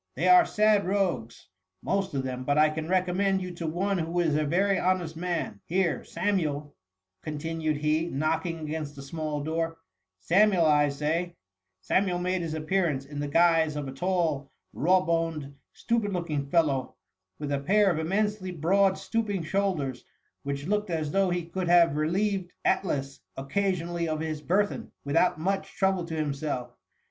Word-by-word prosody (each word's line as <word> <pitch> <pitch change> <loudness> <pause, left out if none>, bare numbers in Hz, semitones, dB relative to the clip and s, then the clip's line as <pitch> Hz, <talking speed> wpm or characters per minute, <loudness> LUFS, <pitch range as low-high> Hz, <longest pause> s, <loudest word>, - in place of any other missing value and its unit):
They - - 0
are 360 -1 +7
sad 210 -2 +3
rogues, 180 - -1 0.4
most 195 -4 -1
of 135 - 0
them, 130 -1 -4
but 145 +2 +1
I 155 0 +5
can 155 0 -4
recommend 190 +1 +2
you 185 -1 -5
to 170 -1 -5
one 190 +4 0
who 165 +2 -1
is 165 -4 +2
a 155 - +2
very 195 +6 +2
honest 180 -3 0
man. 170 - -3
Here, 180 -1 0
Samuel,^ 160 -6 -1 0.5
continued 155 0 -2
he, 155 +2 +1
knocking 160 +3 -1
against 150 -2 -5
a 140 - -8
small 150 0 -4
door, 165 +1 -1
^^ - - -25 0.4
Samuel, 180 - +4
I 150 -1 +4
say 150 +4 0
i'' 175 -1 -9 0.5
Samuel 180 - +1
made 180 +1 -1
his 160 -2 -3
appearance, 155 -3 0
in 145 +1 -7
the 145 - -2
guise 165 0 +3
of 145 -2 -3
a - - -5
tall, 160 -3 -1 0.2
raw 185 +4 +3
boned, 165 -5 -1 0.2
stupid 230 -3 -1
looking 155 -6 -2
fellow, 140 -5 +1 0.4
with 145 -1 -4
a 140 - +1
pair 195 +7 +3
of 160 - -1
immensely 200 +3 -1
broad 190 +4 +2
stooping 210 -6 -2
shoulders, 155 -8 -1 0.4
which 140 0 -4
looked 210 +2 0
as 155 -3 -2
though 195 +1 +2
he 175 -1 -1
could 180 +2 -3
have 170 -3 +5
relieved 185 +4 0 0.2
Atlas 140 -8 0 0.2
occasionally 170 +3 -1
of 155 -1 -2
his 155 -1 -3
burthen, 200 +6 0
without 155 +3 +2
much 195 +4 -2
trouble 190 -3 +1
to 165 -1 -5
himself. 145 -4 -3
165 Hz, 165 wpm, -27 LUFS, 150-185 Hz, 0.5 s, are